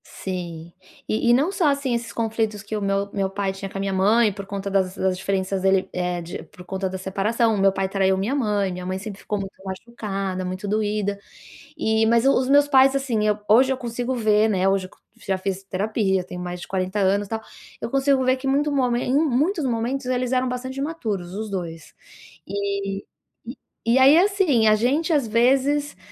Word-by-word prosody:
Sim, 170 Hz, -3 st, -6 dB, 0.3 s
e 220 Hz, +2 st, +1 dB
e -, -, +7 dB
não 285 Hz, +9 st, +3 dB
só 365 Hz, -5 st, +1 dB
assim 280 Hz, -3 st, 0 dB
esses 235 Hz, -1 st, -3 dB
conflitos 220 Hz, -2 st, -2 dB
que 215 Hz, -, -5 dB
o 210 Hz, -, -2 dB
meu 200 Hz, 0 st, -1 dB
meu 195 Hz, -1 st, 0 dB
pai 195 Hz, 0 st, -2 dB
tinha 195 Hz, 0 st, -7 dB
com 195 Hz, -, -7 dB
a -, -, -3 dB
minha 195 Hz, 0 st, -1 dB
mãe 210 Hz, +3 st, +3 dB
por 200 Hz, 0 st, -8 dB
conta 200 Hz, 0 st, -4 dB
das 190 Hz, -1 st, 0 dB
das 190 Hz, -1 st, +1 dB
diferenças 190 Hz, 0 st, -2 dB
dele, 190 Hz, 0 st, +2 dB
eh, 180 Hz, -1 st, -2 dB
de 170 Hz, -, -7 dB
por 180 Hz, -, -15 dB
conta 190 Hz, +1 st, -3 dB
da 190 Hz, -, -5 dB
separação. 210 Hz, +5 st, 0 dB
O -, -, 0 dB
meu 195 Hz, 0 st, +5 dB
pai 190 Hz, 0 st, -1 dB
traiu 190 Hz, 0 st, +2 dB
a -, -, -4 dB
minha 200 Hz, +7 st, -1 dB
mãe, 210 Hz, -7 st, 0 dB
minha 180 Hz, 0 st, -6 dB
mãe 185 Hz, +1 st, -2 dB
sempre 195 Hz, +1 st, -7 dB
ficou 210 Hz, -, -3 dB
muito 195 Hz, 0 st, -6 dB
machucada, 195 Hz, -2 st, -4 dB
muito 185 Hz, +2 st, -4 dB
doída. 210 Hz, -1 st, -1 dB, 0.6 s
E, 220 Hz, 0 st, +2 dB
mas 235 Hz, +2 st, +3 dB
os 265 Hz, -1 st, +3 dB
meus 285 Hz, +1 st, +5 dB
pais, 270 Hz, -1 st, +5 dB
assim 265 Hz, -5 st, 0 dB, 0.3 s
hoje 255 Hz, +5 st, +6 dB
eu 265 Hz, -, 0 dB
consigo 245 Hz, +1 st, -3 dB
ver, 215 Hz, -2 st, +3 dB
né, 190 Hz, -2 st, +1 dB
hoje, 195 Hz, -1 st, +1 dB, 0.3 s
já 190 Hz, -1 st, -2 dB
fiz 190 Hz, 0 st, -3 dB
terapia, 195 Hz, -1 st, 0 dB
tenho 180 Hz, 0 st, -8 dB
mais 180 Hz, 0 st, -5 dB
de -, -, -8 dB
40 185 Hz, +2 st, -2 dB
anos 200 Hz, +1 st, +2 dB
tal, 225 Hz, +2 st, -3 dB, 0.4 s
eu -, -, -3 dB
consigo 275 Hz, 0 st, +2 dB
ver 255 Hz, +1 st, +3 dB
que 265 Hz, +1 st, -5 dB
muito 290 Hz, +2 st, +1 dB
momen 250 Hz, -3 st, +1 dB
em 260 Hz, -, +2 dB
muitos 305 Hz, +3 st, +1 dB
momentos, 250 Hz, +2 st, -1 dB
eles 255 Hz, -1 st, -1 dB
eram 255 Hz, 0 st, +1 dB
bastante 260 Hz, +2 st, -5 dB
imaturos, 220 Hz, -, -3 dB
os 215 Hz, +1 st, -4 dB
dois. 165 Hz, -4 st, -6 dB, 0.5 s
E 200 Hz, 0 st, -3 dB, 0.8 s
e 230 Hz, +2 st, +3 dB
aí, 270 Hz, +3 st, +7 dB
assim, 360 Hz, -, +3 dB
a 215 Hz, -, +6 dB
gente 275 Hz, +10 st, +1 dB
às 285 Hz, -6 st, +2 dB
vezes 270 Hz, +6 st, +2 dB
210 Hz, 205 wpm, -23 LUFS, 190-255 Hz, 0.8 s, e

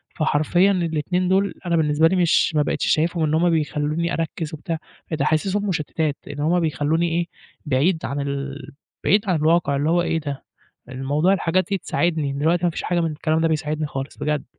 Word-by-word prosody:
فحرفيًا 155 Hz, +5 st, +2 dB
الاتنين 180 Hz, 0 st, 0 dB
دول 195 Hz, +1 st, +2 dB
أنا 170 Hz, -1 st, +1 dB
بالنسبة 155 Hz, 0 st, +3 dB
لي 185 Hz, -, +1 dB
مش 175 Hz, -2 st, +3 dB
ما 150 Hz, -, +4 dB
بقيتش -, -, -1 dB
شايفهم 165 Hz, +1 st, +1 dB
إن 155 Hz, -, +1 dB
هُم 170 Hz, +2 st, +3 dB
بيخلوني 155 Hz, +1 st, 0 dB
أركز 165 Hz, -1 st, -3 dB
وبتاع 160 Hz, +2 st, -4 dB, 0.3 s
ده 150 Hz, -2 st, 0 dB
حاسسهم 195 Hz, +7 st, 0 dB
مشتتات 155 Hz, -3 st, -1 dB
إن 145 Hz, -, -7 dB
هُم 165 Hz, +4 st, +2 dB
بيخلوني 160 Hz, +1 st, 0 dB
إيه 170 Hz, +1 st, -1 dB, 0.4 s
بعيد 155 Hz, +5 st, +1 dB
عن 140 Hz, +1 st, -3 dB
ال 140 Hz, 0 st, -4 dB, 0.3 s
بعيد 205 Hz, +2 st, +4 dB
عن 180 Hz, -, +3 dB
الواقع 155 Hz, -2 st, +2 dB
اللي 145 Hz, +3 st, 0 dB
هو 175 Hz, +1 st, +3 dB
إيه 165 Hz, -1 st, 0 dB
ده 145 Hz, -3 st, -6 dB, 0.5 s
الموضوع 140 Hz, +7 st, +1 dB
الحاجات 185 Hz, -1 st, +1 dB
دي 195 Hz, -, +1 dB
تساعدني 160 Hz, -6 st, -1 dB
دلوقتي 160 Hz, +5 st, +1 dB
ما 175 Hz, -, +3 dB
فيش -, -, -5 dB
حاجة 175 Hz, -1 st, 0 dB
من 165 Hz, -1 st, 0 dB
الكلام 155 Hz, +1 st, 0 dB
ده 165 Hz, -, +2 dB
بيساعدني 155 Hz, 0 st, -1 dB
خالص 135 Hz, -1 st, -6 dB
بجد. 150 Hz, -2 st, -1 dB
160 Hz, 190 wpm, -22 LUFS, 150-175 Hz, 0.5 s, ما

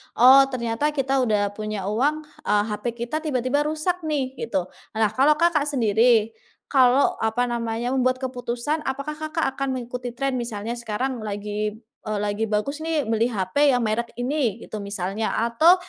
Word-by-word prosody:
oh, 265 Hz, +3 st, +8 dB
ternyata 255 Hz, +3 st, -1 dB
kita 270 Hz, 0 st, +1 dB
udah 210 Hz, -5 st, +1 dB
punya 210 Hz, -2 st, -4 dB
uang, 295 Hz, +8 st, +1 dB
eee, 210 Hz, -8 st, -1 dB
HP 210 Hz, -, -5 dB, 0.2 s
kita 305 Hz, +6 st, -2 dB
tiba-tiba 285 Hz, -1 st, 0 dB
rusak 315 Hz, +4 st, -1 dB
nih 275 Hz, -4 st, -1 dB
gitu. 195 Hz, -6 st, -1 dB, 0.3 s
Nah, 220 Hz, -2 st, +2 dB
kalau 275 Hz, +7 st, +4 dB
Kakak 310 Hz, -3 st, +2 dB
sendiri, 225 Hz, -3 st, +3 dB, 0.4 s
kalau 260 Hz, 0 st, +4 dB
apa 225 Hz, +2 st, +1 dB
namanya 235 Hz, 0 st, -2 dB
membuat 255 Hz, -1 st, +2 dB
keputusan 255 Hz, +3 st, -3 dB
apakah 280 Hz, +3 st, -3 dB
Kakak 310 Hz, +1 st, -2 dB, 0.2 s
akan 270 Hz, -1 st, -1 dB
mengikuti 245 Hz, -1 st, -5 dB
tren 270 Hz, -1 st, -1 dB
misalnya 230 Hz, -2 st, -4 dB
sekarang 240 Hz, +2 st, -3 dB
lagi, 210 Hz, 0 st, -3 dB, 0.3 s
eee, 215 Hz, -1 st, -1 dB
lagi 210 Hz, +2 st, -1 dB
bagus 220 Hz, +8 st, -1 dB
nih 320 Hz, -2 st, 0 dB
beli 225 Hz, +1 st, +2 dB
HP 245 Hz, +6 st, +2 dB
yang 245 Hz, -, +1 dB
merek 230 Hz, +1 st, -2 dB
ini 245 Hz, -3 st, 0 dB
gitu 215 Hz, -, -6 dB
misalnya 200 Hz, +1 st, -3 dB
atau, 235 Hz, +11 st, +5 dB
245 Hz, 160 wpm, -24 LUFS, 220-280 Hz, 0.4 s, oh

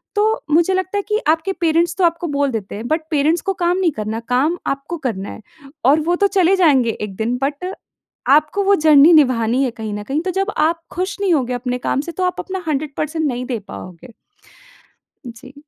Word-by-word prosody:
तो 435 Hz, +2 st, +1 dB
मुझे 340 Hz, +4 st, +3 dB
लगता 375 Hz, +2 st, -1 dB
है -, -, +1 dB
कि 425 Hz, 0 st, +1 dB
आपके 320 Hz, +5 st, +1 dB
पेरेंट्स 335 Hz, +1 st, +2 dB
तो 375 Hz, -, +1 dB
आपको 335 Hz, 0 st, +1 dB
बोल 285 Hz, -2 st, 0 dB
देते 210 Hz, -5 st, -5 dB
हैं। 225 Hz, +4 st, -6 dB
बट 315 Hz, +1 st, 0 dB
पेरेंट्स 310 Hz, +3 st, +2 dB
को 390 Hz, -, -1 dB
काम 350 Hz, +1 st, +2 dB
नहीं 370 Hz, -3 st, +2 dB
करना 220 Hz, -2 st, -4 dB
काम 305 Hz, +8 st, +2 dB
आपको 275 Hz, +5 st, -3 dB
करना 195 Hz, -3 st, -4 dB
है। -, -, -9 dB, 0.4 s
और 290 Hz, +4 st, +5 dB
वो 340 Hz, +3 st, +1 dB
तो 400 Hz, +3 st, +2 dB
चले 370 Hz, +1 st, +4 dB
जाएँगे 280 Hz, -10 st, +3 dB
एक 210 Hz, -2 st, -5 dB
दिन 235 Hz, +5 st, -1 dB
बट 295 Hz, +7 st, -3 dB, 0.6 s
आपको 305 Hz, +8 st, +3 dB
वो 400 Hz, +1 st, +4 dB
जर्नी 305 Hz, +1 st, +7 dB
निभानी 255 Hz, -4 st, +3 dB
है 255 Hz, -, 0 dB
कहीं 220 Hz, -2 st, -5 dB
न 205 Hz, 0 st, -5 dB
कहीं 280 Hz, +8 st, -2 dB
तो 370 Hz, -, 0 dB
जब 390 Hz, +2 st, -1 dB
आप 330 Hz, +2 st, +1 dB
खुश 370 Hz, +3 st, -3 dB
नहीं 375 Hz, -4 st, +2 dB
होंगे 255 Hz, -4 st, 0 dB
अपने 250 Hz, 0 st, -2 dB
काम 275 Hz, -, +1 dB
से 340 Hz, +4 st, -7 dB
तो 370 Hz, -, -3 dB
आप 360 Hz, -1 st, -1 dB
अपना 380 Hz, -1 st, -5 dB
100% 305 Hz, +2 st, -2 dB
नहीं 250 Hz, -2 st, -3 dB
दे 245 Hz, -4 st, -3 dB
पाओगे। 185 Hz, +7 st, -10 dB, 1.1 s
जी। 255 Hz, +3 st, -11 dB
305 Hz, 210 wpm, -19 LUFS, 250-350 Hz, 1.1 s, जर्नी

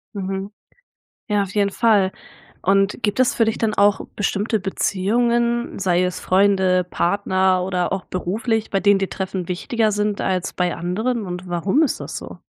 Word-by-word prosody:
Mhm. 195 Hz, 0 st, -4 dB, 0.8 s
Ja, 205 Hz, -1 st, +2 dB
auf 195 Hz, 0 st, -8 dB
jeden 200 Hz, -1 st, +2 dB
Fall. 200 Hz, -3 st, +3 dB, 0.5 s
Und 195 Hz, +1 st, +2 dB
gibt 205 Hz, +2 st, -1 dB
es 255 Hz, -, +2 dB
für 230 Hz, -, +2 dB
dich 220 Hz, -, -1 dB
dann 220 Hz, -2 st, 0 dB
auch 205 Hz, 0 st, +3 dB, 0.2 s
bestimmte 210 Hz, +2 st, 0 dB
Beziehungen, 235 Hz, +6 st, 0 dB
sei 180 Hz, -2 st, +2 dB
es 180 Hz, 0 st, -2 dB
Freunde, 190 Hz, -1 st, +3 dB
Partner 185 Hz, +1 st, +1 dB
oder 180 Hz, -1 st, -1 dB
auch 195 Hz, -, -3 dB
beruflich, 215 Hz, +5 st, -2 dB
bei 195 Hz, -, +1 dB
denen 200 Hz, 0 st, +4 dB
dir 195 Hz, -, -1 dB
Treffen 190 Hz, -2 st, -4 dB
wichtiger 215 Hz, +5 st, 0 dB
sind 210 Hz, 0 st, -1 dB
als 185 Hz, -1 st, -1 dB
bei 180 Hz, -1 st, 0 dB
anderen, 215 Hz, +7 st, -2 dB
und 180 Hz, 0 st, -6 dB
warum 180 Hz, -, +1 dB
ist 300 Hz, -, -1 dB
das -, -, -6 dB
so? -, -, -9 dB
195 Hz, 170 wpm, -21 LUFS, 185-210 Hz, 0.8 s, denen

